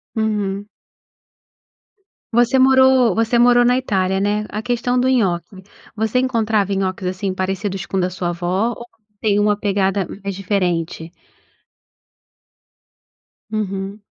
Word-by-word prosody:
Uhum. 205 -2 -1 1.7
Você 240 +3 +3
morou 260 -3 +5
você 225 +4 +1
morou 245 0 +5
na 250 +1 +3
Itália, 190 -6 0
né? 210 +1 0
A 215 - -4
questão 245 +1 -1
do 255 +1 +2
nhoque, 190 -5 0 0.3
você 220 +2 -1
encontrava 220 -5 0
nhoques 190 -1 -2
assim 185 +1 -2
parecidos 190 +1 -3
com 195 - -3
o - - +2
da 180 0 0
sua 180 -1 -3
avó, 180 +6 -1
ou 235 0 -7 0.3
tem 205 -1 +1
uma 205 0 +2
pegada 195 -2 0 0.2
mais 200 0 -3
diferente? 175 -4 -2 2.4
Uhum. 200 -1 -4
205 Hz, 125 wpm, -19 LUFS, 190-235 Hz, 2.4 s, morou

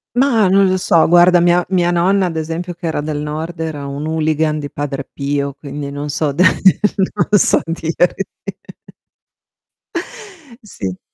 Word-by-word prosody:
Mah, 245 -6 +3
non 195 +1 +4
lo 185 - +1
so, 170 -3 +3
guarda, 175 +1 +5
mia 175 +1 +3
mia 175 -2 +1
nonna 185 +3 +2
ad 170 -2 -3
esempio 165 +3 -4
che 170 0 -6
era 160 - -2
del 150 0 -3
Nord 155 +3 -5
era 155 -3 -4
un 140 +2 -5
hooligan 155 -1 0
di 145 -2 -6
Padre 140 -2 -4
Pio, 140 0 -2
quindi 140 0 -7
non 145 +1 -5
so 150 0 -1
da 175 +6 +2 0.7
non 205 - +2
so - - +3
dirti 170 +3 -1 2.4
Sì. 95 - -6
160 Hz, 150 wpm, -17 LUFS, 145-175 Hz, 2.4 s, guarda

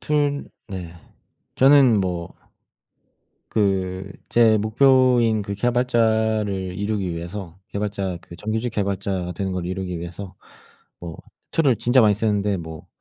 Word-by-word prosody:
툴 145 -1 0 0.2
네 90 -4 -6 0.6
저는 135 -5 +6
뭐 90 -3 -3 1.2
그 95 -2 -1 0.2
제 115 -2 +4
목표인 120 0 +3
그 100 0 -4
개발자를 110 -5 0
이루기 100 -3 -2
위해서 85 +1 -7
개발자 100 -3 -3
그 85 - -13
정규직 110 +5 -2
개발자가 100 -3 -2
되는 95 +2 -3
걸 90 -1 -3
이루기 90 -1 -4
위해서 90 +3 -8 0.7
뭐 85 -2 -7 0.4
툴을 140 -7 +3
진짜 120 +4 +3
많이 105 -2 +5
쓰는데 105 -2 0
뭐 80 -2 -9
100 Hz, 240 characters per minute, -22 LUFS, 95-115 Hz, 1.2 s, 저는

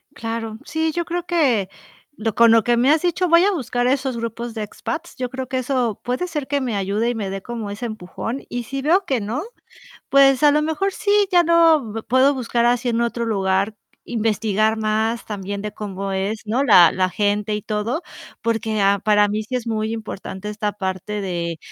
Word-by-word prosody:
Claro, 225 -1 -4
sí, 320 0 -1
yo 345 +2 -2
creo 350 +1 -3
que 265 - +1 0.5
lo 220 -2 -2
con 235 +2 +6
lo 225 -1 +5
que 240 +2 +2
me 250 +4 +3
has 315 +2 +3
dicho, 355 +1 +1
voy 335 +1 +6
a 410 - +3
buscar 245 - -1
esos 265 -1 0
grupos 230 0 -5
de 220 - -3
expats. 325 +10 -6
Yo 250 -1 -3
creo 260 0 -5
que 260 +1 -1
eso, 250 -4 -1
puede 250 +9 -2
ser 300 -6 -4
que 285 0 0
me 245 -5 -2
ayude 200 +4 0
y 240 - -2
me 200 -3 -3
dé 195 0 -5
como 230 -3 -5
ese 205 +4 -5
empujón. 225 +4 -5
Y 245 0 -3
si 270 +4 -5
veo 360 +7 +3
que 265 -8 0
no, 230 +10 -3 0.7
pues 275 -1 +5
a 295 - +7
lo 300 - +2
mejor 320 +6 0
sí, 410 +1 +2
ya 350 -1 +5
lo 315 -10 +3
puedo 260 +3 +4
buscar 240 -2 0
así 245 0 +2
en 230 -1 0
otro 235 0 -1
lugar, 195 -1 0 0.3
investigar 220 -1 0
más 220 +2 0
también 200 -1 -5
de 210 0 -4
cómo 195 -2 -5
es, 195 +3 -2
¿no? 235 +6 +1
La 175 -11 +7
la 185 0 0
gente 205 +2 0
y 210 - -4
todo, 220 - -2 0.4
porque 225 -2 -1
a 200 0 +3
para 210 +1 +3
mí 215 +1 -1
sí 255 +4 -5
es 245 -2 -3
muy 220 0 -1
importante 210 -2 -6
esta 210 -1 -2
parte 200 +1 -4
de 170 -3 -3
230 Hz, 205 wpm, -21 LUFS, 210-270 Hz, 0.7 s, a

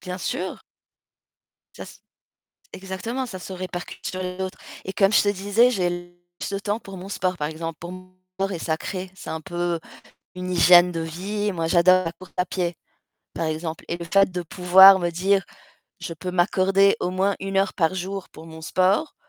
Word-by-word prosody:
Bien 180 -1 -6
sûr. 185 +1 -4 1.1
Ça - - -8
s - - -14 0.7
exactement, 195 +7 -4
ça 190 -6 -8
se 190 - -8
répercute 180 -1 -7
sur 185 - -4 0.2
d'autres 190 -1 -4 0.3
et 190 - -5
comme 195 +2 +3
je - - +6
te 205 - +1
disais, 205 +5 +3
j'ai 175 -4 -2 0.3
plus - - -4
le 195 - -1
temps 210 +2 -2
pour 195 -3 -10
mon 185 - -8
sport 185 -2 -2
par 150 -2 -2
exemple, 160 0 -6
pour 175 +1 -7
mon 185 0 -12 0.4
et 175 - -4
sacrée, 180 +4 -3
c'est - - -9
un 160 - -3
peu 175 0 -2 0.5
une 180 0 -5
hygiène 175 0 +6
de 165 -1 -3
vie. 200 +6 -3
Moi, 165 -3 -2
j'adore 185 +2 +5
la 165 - -2
course 185 +2 -15
à 180 - +2
pied, 175 -2 -2 0.6
par 165 - -3
exemple 160 +1 -4
et 170 - -2
le 170 - -7
fait 195 +3 +3
de 180 -1 -3
pouvoir 190 +3 +7
me 175 -2 -1
dire 190 +3 +2 0.6
je 165 - -5
peux 180 +3 -5
m'accorder 190 +2 +3
au 180 - -1
moins 190 +2 +1
1 195 0 -3
heure 195 +1 +1
par 165 -1 +1
jour 190 +1 -5
pour 160 - -12
mon 160 0 -11
sport, 185 - +1
185 Hz, 195 wpm, -23 LUFS, 175-195 Hz, 1.1 s, pouvoir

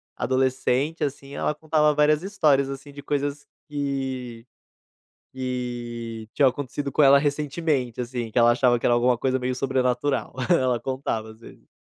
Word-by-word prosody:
adolescente, 130 +4 0
assim, 140 -1 -4
ela - - 0
contava 150 0 +2
várias 150 +1 +3
histórias, 150 -9 +2
assim, 135 +1 -8
de 145 0 -10
coisas 145 0 -3 0.2
que 135 -5 -4 0.9
que 120 -3 -5
tinham 140 -3 +5
acontecido 140 +1 -4
com 150 - +3
ela 140 0 +7
recentemente, 145 -3 -1
assim, 120 -2 -4
que 120 - +2
ela 120 0 +6
achava 120 0 +3
que - - -4
era 120 - +4
alguma 120 +1 +3
coisa 130 +2 0
meio 130 0 -2
sobrenatural, 130 +1 0 0.2
ela 130 -8 +3
contava 120 -3 -3
às 110 - -17
vezes. - - -15
130 Hz, 150 wpm, -24 LUFS, 125-145 Hz, 0.9 s, ela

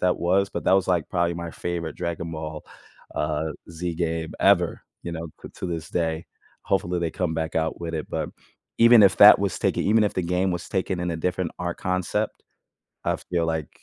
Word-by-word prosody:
that 90 0 +2
was, 95 +3 +2
but - - -4
that - - +4
was, 95 -1 +3
like, 90 -3 +1
probably 85 -1 0
my 85 -1 -6
favorite 85 -3 -4
Dragon 85 -1 -4
Ball, 80 -1 -6 0.5
uh, 75 +1 -1 0.2
Z 85 +1 -4
game 80 -1 -2
ever, - - +3 0.2
you 85 - -4
know, 85 0 -5
c - - -9
to - - -5
this 85 -2 -4
day. 80 -2 -1 0.4
Hopefully, 90 -2 0
they 85 -2 -1
come 90 -3 -1
back 80 0 -3
out 80 +1 -1
with 85 -1 -4
it, 80 - -4
but - - -2 0.5
even 115 -1 +8
if 95 - +4
that - - +10
was - - -1
taken - - +1
even 110 +2 +4
if 105 - 0
the 95 - 0
game 90 +2 0
was 90 -1 -4
taken 95 -1 -1
in 90 0 -1
a - - -3
different 90 +1 -2
art 85 -1 -2
concept, 90 -1 -2 0.6
I - - +1
feel 85 -2 -2
like 80 -2 -2
85 Hz, 210 wpm, -25 LUFS, 80-90 Hz, 0.6 s, that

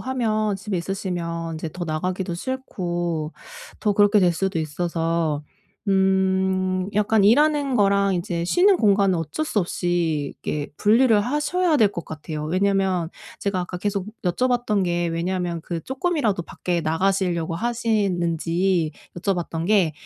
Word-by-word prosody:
하면 215 -5 0
집에 200 0 -4
있으시면 170 -3 -3
이제 160 +1 -4
더 180 - -4
나가기도 180 +3 -2
싫고 175 - -3 0.5
더 210 - +2
그렇게 205 +1 +4
될 180 -2 +4
수도 190 0 -1
있어서 165 -1 -1 0.5
음 190 -1 +2
약간 210 +1 +3
일하는 285 +4 +4
거랑 200 -2 +3
이제 170 -1 -2
쉬는 370 - +4
공간은 200 - +3
어쩔 165 - -3
수 225 -9 0
없이 170 -5 -1
이렇게 145 -1 -2
분리를 220 +1 +4
하셔야 300 - +1
될 220 -6 +5
것 170 - -5
같아요. 155 0 -6
왜냐하면 185 0 +1 0.3
제가 200 -2 -1
아까 180 0 -5
계속 200 0 -2 0.2
여쭤봤던 240 +1 +1
게 175 -1 0
왜냐하면 170 0 -2
그 170 -1 -4
쪼끔이라도 265 - 0
밖에 175 +1 -3
나가시려고 170 0 0
하시는지 180 -6 0 0.3
여쭤봤던 175 -3 -2
게 190 -7 +3
185 Hz, 305 characters per minute, -23 LUFS, 170-210 Hz, 0.5 s, 될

